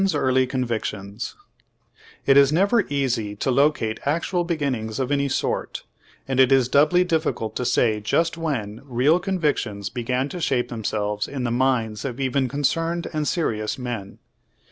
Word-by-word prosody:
LINCOLN'S 195 Hz, -4 st, +2 dB
EAULY 130 Hz, -2 st, +2 dB
CONVICTIONS 110 Hz, -4 st, -3 dB, 0.9 s
It 135 Hz, -, +5 dB
is 140 Hz, 0 st, +6 dB
never 200 Hz, +6 st, +3 dB
easy 125 Hz, -7 st, -1 dB
to 130 Hz, -, -1 dB
locate 130 Hz, -5 st, +2 dB
actual 170 Hz, +4 st, 0 dB
beginnings 135 Hz, -10 st, -2 dB
of 130 Hz, +1 st, -1 dB
any 140 Hz, -1 st, +1 dB
sort, -, -, -2 dB, 0.4 s
and 135 Hz, -1 st, -1 dB
it 130 Hz, 0 st, +6 dB
is 135 Hz, -3 st, +4 dB
doubly 155 Hz, +7 st, +4 dB
difficult 160 Hz, -10 st, -1 dB
to 125 Hz, -, -2 dB
say 115 Hz, -3 st, +2 dB
just 165 Hz, +11 st, +1 dB
when 125 Hz, -11 st, -3 dB
real 140 Hz, +6 st, +3 dB
convictions 150 Hz, -, -1 dB
began 125 Hz, +2 st, -1 dB
to 180 Hz, -, -6 dB
shape 130 Hz, -5 st, 0 dB
themselves 105 Hz, -2 st, -2 dB
in 135 Hz, -3 st, -4 dB
the 120 Hz, -, -1 dB
minds 120 Hz, -4 st, 0 dB
of 130 Hz, -1 st, -4 dB
even 135 Hz, 0 st, +1 dB
concerned 165 Hz, +5 st, -1 dB
and 155 Hz, -1 st, -1 dB
serious 110 Hz, -11 st, -1 dB
m.en. 120 Hz, -6 st, -5 dB
130 Hz, 155 wpm, -23 LUFS, 115-150 Hz, 0.9 s, is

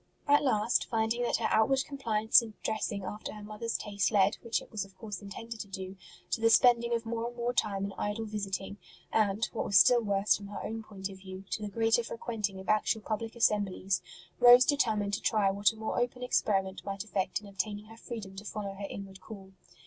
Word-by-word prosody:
At 290 Hz, 0 st, +5 dB
last, 230 Hz, -3 st, +2 dB
finding 225 Hz, +1 st, 0 dB
that 240 Hz, -, +1 dB
her -, -, 0 dB
outward 265 Hz, +5 st, +3 dB
compliance 225 Hz, -7 st, +3 dB
in 220 Hz, -2 st, -9 dB
dressing 215 Hz, -2 st, -2 dB
after 210 Hz, +3 st, -6 dB
her 210 Hz, -1 st, -9 dB
mother 215 Hz, +2 st, -7 dB
s 230 Hz, -, 0 dB
taste 205 Hz, -1 st, -1 dB
led, 200 Hz, 0 st, +3 dB
which 230 Hz, -1 st, -1 dB
it -, -, -15 dB
was 215 Hz, -4 st, -2 dB
of 195 Hz, -1 st, -16 dB
course 205 Hz, 0 st, -6 dB
intended 225 Hz, +3 st, -8 dB
to 205 Hz, -, -6 dB
do, 190 Hz, -1 st, -7 dB, 0.4 s
to 225 Hz, -, -1 dB
the 230 Hz, -, +5 dB
spending 235 Hz, 0 st, +5 dB
of 230 Hz, 0 st, -3 dB
more 230 Hz, +1 st, -2 dB
and 240 Hz, 0 st, -9 dB
more 240 Hz, +1 st, -1 dB
time 200 Hz, -4 st, 0 dB
in 200 Hz, -, -5 dB
idle 205 Hz, +2 st, -2 dB
visiting, 200 Hz, -2 st, -4 dB, 0.4 s
and, 210 Hz, 0 st, +2 dB
what 230 Hz, -, -1 dB
was 195 Hz, -, +3 dB
still 240 Hz, +6 st, +7 dB
worse 200 Hz, -1 st, +2 dB
from 200 Hz, -, -8 dB
her 205 Hz, -, -7 dB
own 225 Hz, +1 st, -4 dB
point 200 Hz, -3 st, -7 dB
of 190 Hz, -1 st, -11 dB
view, 190 Hz, 0 st, -9 dB
to -, -, -2 dB
the 210 Hz, -, -4 dB
greater 225 Hz, +2 st, +2 dB
frequenting 215 Hz, -4 st, -4 dB
of 190 Hz, -, -10 dB
actual 215 Hz, +1 st, +2 dB
public 225 Hz, +2 st, -4 dB
assemblies, 200 Hz, -4 st, +1 dB, 0.4 s
Rose 245 Hz, +1 st, +9 dB
determined 215 Hz, -8 st, +1 dB
to 200 Hz, -, -1 dB
try 205 Hz, -3 st, +2 dB
what 200 Hz, +2 st, +3 dB
a -, -, -14 dB
more 220 Hz, +2 st, -2 dB
open 245 Hz, +1 st, -2 dB
experiment 195 Hz, -5 st, 0 dB
might 195 Hz, 0 st, -4 dB
effect 200 Hz, -3 st, -1 dB
in 210 Hz, -, -15 dB
obtaining 205 Hz, +1 st, -4 dB
her 225 Hz, +1 st, -13 dB
freedom 220 Hz, -4 st, -8 dB
to 200 Hz, -, -7 dB
follow 205 Hz, -1 st, -5 dB
her 200 Hz, +1 st, -6 dB
inward 195 Hz, -1 st, -8 dB
call. 195 Hz, -1 st, -11 dB
210 Hz, 220 wpm, -30 LUFS, 195-230 Hz, 0.4 s, Rose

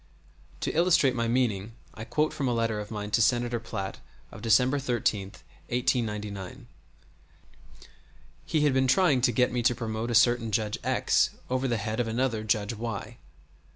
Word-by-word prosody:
[*] -, -, -28 dB
To -, -, -1 dB
illustrate 165 Hz, -5 st, +3 dB
my 115 Hz, -1 st, -1 dB
meaning 115 Hz, -4 st, 0 dB, 0.2 s
I 110 Hz, -, -8 dB
quote 150 Hz, +4 st, 0 dB
from 140 Hz, -, -2 dB
a 120 Hz, -, 0 dB
letter 115 Hz, -2 st, 0 dB
of 105 Hz, 0 st, -6 dB
mine 105 Hz, -1 st, -5 dB
to 115 Hz, -, +3 dB
Senator 120 Hz, 0 st, +1 dB
Platt 100 Hz, -4 st, -5 dB, 0.3 s
of -, -, -11 dB
December 125 Hz, +5 st, +3 dB
13, 115 Hz, -6 st, -1 dB, 0.4 s
1899. 115 Hz, -1 st, -2 dB, 1.8 s
He 155 Hz, -, 0 dB
had 145 Hz, -2 st, +3 dB
been 130 Hz, 0 st, +2 dB
trying 145 Hz, -2 st, +3 dB
to 125 Hz, 0 st, +3 dB
get 125 Hz, +2 st, +2 dB
me 120 Hz, 0 st, -1 dB
to 120 Hz, +1 st, +2 dB
promote 115 Hz, 0 st, -4 dB
a 120 Hz, -, 0 dB
certain 115 Hz, -1 st, +3 dB
Judge 105 Hz, -1 st, -1 dB
X -, -, +2 dB, 0.2 s
over 130 Hz, +1 st, 0 dB
the 120 Hz, -2 st, 0 dB
head 110 Hz, +2 st, -3 dB
of 120 Hz, -, 0 dB
another 115 Hz, -1 st, -1 dB
Judge 105 Hz, 0 st, 0 dB
Y. 115 Hz, 0 st, -5 dB
115 Hz, 170 wpm, -27 LUFS, 110-125 Hz, 1.8 s, illustrate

